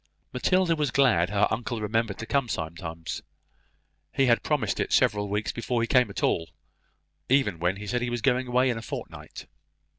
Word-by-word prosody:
Matilda 180 +6 +2
was 150 -3 0
glad 115 -10 +3
her 100 0 +2
uncle 115 +1 -2
remembered 110 -1 -1
to 115 - -6
come 135 0 0
sometimes. 80 -1 -5 0.9
He 135 - +2
had 120 -2 +3
promised - - -1
it - - -1
several 105 -1 +2
weeks 105 +1 -1
before 120 +1 -2
he 115 - 0
came 125 -2 +3
at 100 - -5
all; 80 -1 +1 0.8
even 125 -10 +2
when 90 +3 +1
he 105 +1 -8
said 125 +4 -1
he 120 - -1
was 120 -2 -3
going 125 +2 +2
away 125 +1 +2
in 115 - -3
a - - -8
fortnight. - - -8
115 Hz, 185 wpm, -26 LUFS, 100-125 Hz, 0.9 s, glad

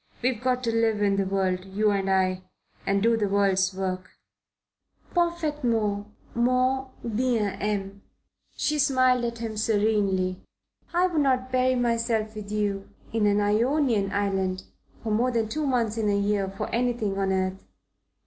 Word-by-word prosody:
We've 250 -3 0
got 255 0 0
to 230 - +1
live 225 -2 +2
in 200 -1 +2
the 195 -1 +1
world, 185 -1 0
you 205 +2 +1
and 195 -1 0
I, 185 -1 +2 0.5
and 195 0 +2
do 230 0 +4
the 215 -2 0
world's 195 -1 +2
work." 185 -1 -4 1.0
"Parfaitement, 290 - 0 0.3
mon 255 +2 +1 0.2
bien 230 -3 0
aime." 200 -1 -2 0.6
She 300 0 0
smiled 255 -3 +3
at 235 0 -3
him 225 -2 -5
serenely. 205 -4 +1 0.5
"I 350 +1 +3
would 340 -5 +1
not 255 -2 +1
bury 255 0 +2
myself 230 -2 0
with 210 -1 -8
you 205 -2 -1 0.2
in 220 -2 +2
an 205 0 +3
Ionian 220 0 +2
island 190 -2 -1 0.4
for 220 - -2
more 235 +4 +2
than 230 -3 0
two 300 +4 -2
months 230 -4 0
in 215 -2 +1
a 200 - +2
year 200 -1 0
for 195 - -5
anything 230 -5 -1
on 195 -1 +1
earth. 190 0 -1
215 Hz, 155 wpm, -26 LUFS, 195-245 Hz, 1.0 s, do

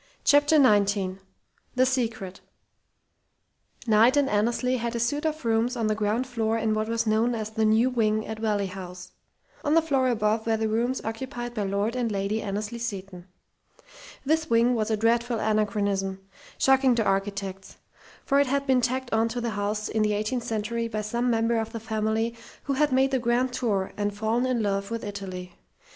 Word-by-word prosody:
CHAPTER 290 +2 +4
XIX 200 -8 +3 0.6
THE 255 +1 +4
SECRET 225 -7 -2 1.5
Knight 230 +4 +5
and 285 -1 +3
Annesley 240 +4 +1
had 235 0 -3
a - - -1
suite 290 +7 0
of 310 -3 -4
rooms 230 +2 +1
on 230 - 0
the 215 - +2
ground 215 +3 0
floor 225 -3 -1
in 220 -1 0
what 215 0 -1
was 230 0 0
known 225 +2 +2
as 215 -1 -4
"the 220 0 0
new 220 +3 +4
wing" 215 -3 +1
at 220 0 -6
Valley 210 -2 0
House. 180 -1 -8 0.5
On 295 +2 +2
the 330 - +6
floor 270 -5 +1
above 220 -1 0
were 225 -1 +2
the 220 0 0
rooms 235 +4 0
occupied 240 +2 -5
by 215 - -3
Lord 200 +4 -1
and 240 -3 -1
Lady 200 +2 -1
Annesley 210 +3 -4
Seton. 195 -5 -6 1.0
This 315 +2 +1
wing 235 +2 +4
was 220 -2 -1
a 220 - +1
dreadful 235 +2 +1
anachronism, 200 -3 0 0.4
shocking 265 -2 +4
to 230 - +1
architects, 195 -1 -2 0.5
for 280 0 +3
it 285 - +3
had 280 +1 0
been 260 -2 +3
tacked 255 0 -2
on 220 +1 +3
to 245 +2 -3
the 235 -1 -2
house 210 +1 -2
in 220 - -1
the 210 0 +2
eighteenth 215 +4 -2
century 230 +1 -2
by 215 -2 -3
some 235 +4 -1
member 230 0 +1
of 225 0 -4
the 230 - -4
family 220 +1 -1 0.3
who 280 - -1
had 295 +1 +2
made 265 +1 +3
the 265 - +1
"grand 245 +1 +1
tour" 205 -7 -1
and 205 0 -2
fallen 225 +4 0
in 245 -3 0
love 200 -1 -1
with 230 0 -4
Italy. 190 -3 -6
225 Hz, 185 wpm, -26 LUFS, 210-245 Hz, 1.5 s, the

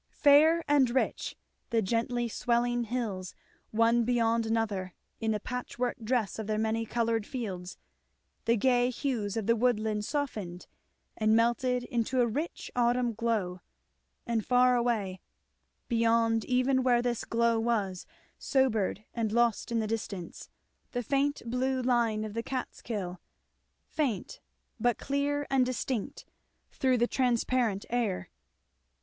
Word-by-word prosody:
Fair 310 +3 +6
and 285 -4 +4
rich, 255 +2 -1 0.3
the 230 - +2
gently 235 +3 0
swelling 240 +1 0
hills, 210 -6 -3 0.3
one 230 +2 +3
beyond 230 -1 +1
another, 205 -5 -1 0.2
in 225 - -1
the 215 -1 +1
patchwork 250 +1 -3
dress 225 -3 0
of 220 - -4
their 215 -1 0
many 220 +1 0
coloured 230 -1 0
fields, 190 -7 -5 0.7
the 230 +1 +3
gay 245 +2 +3
hues 235 -5 -2
of 220 - -2
the 230 +2 +3
woodland 220 -3 +1
softened 210 - -3 0.5
and 215 0 +3
melted 240 +2 +2
into 245 +1 -1
a 245 - +5
rich 285 +9 -4
autumn 240 0 +2
glow, 210 -6 -1 0.6
and 230 -2 0
far 250 +1 +4
away, 220 -6 0 0.7
beyond 230 -1 +2
even 255 +1 +2
where 245 -2 +3
this 240 -2 -1
glow 230 0 +2
was 210 -6 -1 0.3
sobered 225 -7 +1
and 225 -3 -1
lost 235 0 +1
in 235 - +1
the 220 - 0
distance, 205 -5 -5 0.4
the 245 -1 -1
faint 280 +4 0
blue 255 +2 0
line 235 -4 +1
of 215 -1 -5
the 230 - -2
Catskill; 215 -7 -5 0.6
faint, 260 -11 -2 0.4
but 240 0 +2
clear 285 +1 -1
and 265 -1 +4
distinct 250 -3 -3 0.5
through 260 -2 +2
the 240 - +3
transparent 240 -4 +1
air. 210 -7 -1
235 Hz, 130 wpm, -30 LUFS, 220-250 Hz, 0.7 s, Fair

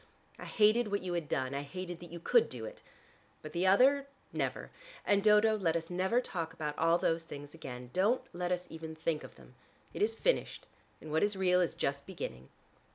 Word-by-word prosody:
"I - - -7
hated 215 +1 +3
what 200 -1 -1
you 180 -1 -3
had 170 -4 -2
done: 130 0 -1
I 140 - -2
hated 175 +4 -6
that 175 -1 -11
you 170 - -7
could 465 - +4
do - - -6
it. - - -9 0.6
But - - -8
the 180 +2 +1
other, 270 +8 +5 0.3
never. - - -2 0.3
And, 200 -1 +3
Dodo, 215 +1 +5
let 170 -6 0
us 165 +1 -3
never 190 +7 +2
talk 165 -9 -4
about 150 -2 -4
all 165 +2 +3
those 165 -1 0
things 145 -2 -9
again, 125 -6 -8
don't 210 +7 +2
let 175 +1 -2
us 180 0 -1
even 160 0 -7
think 160 -1 -1
of - - -11
them. - - -17 0.4
It - - -5
is 445 +2 +2
finished, - - 0 0.4
and 155 - -8
what 160 - +2
is 205 0 +2
real 180 -1 +3
is 175 - 0
just 140 0 -2
beginning." 65 - -6
175 Hz, 210 wpm, -32 LUFS, 160-205 Hz, 0.6 s, other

